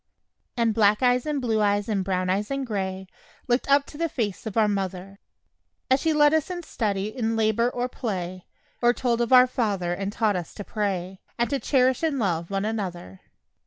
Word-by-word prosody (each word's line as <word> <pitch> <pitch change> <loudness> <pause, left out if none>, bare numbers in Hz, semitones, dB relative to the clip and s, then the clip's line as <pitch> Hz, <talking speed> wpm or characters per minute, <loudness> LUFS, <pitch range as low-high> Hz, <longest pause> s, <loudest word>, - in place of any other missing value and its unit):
And 230 -2 +2
black 210 +1 +3
eyes 250 +2 +3
and 295 -2 0
blue 225 -4 0
eyes 205 0 +1
and 205 -4 0
brown 185 -1 -1
eyes 195 +3 0
and 275 -1 -2
gray 190 -4 -3 0.4
Looked 245 +2 0
up 280 0 +4
to 295 - -12
the 335 0 0
face 220 -6 -3
of 220 - -5
our 220 -1 +4
mother, 195 -1 -3 0.7
As 260 - +5
she 320 - +1
led 295 -1 +4
us 315 +2 +1
in 355 -1 -5
study 210 -7 -2
in 225 -3 -1
labor 225 +2 +2
or 245 0 -2
play, 185 -7 -5 0.4
Or 240 0 +4
told 240 -2 0
of 235 - -1
"Our 255 -1 +8
Father," 205 -8 -1
and 195 +2 -3
taught 215 -1 +1
us 175 -3 -5
to 205 - -6
pray, 190 -3 -3 0.2
And 235 +2 0
to 280 - 0
cherish 260 -2 +2
and 315 -4 0
love 170 -7 -1
one 195 0 -1
another. 180 - -5
220 Hz, 200 wpm, -25 LUFS, 195-250 Hz, 0.7 s, Our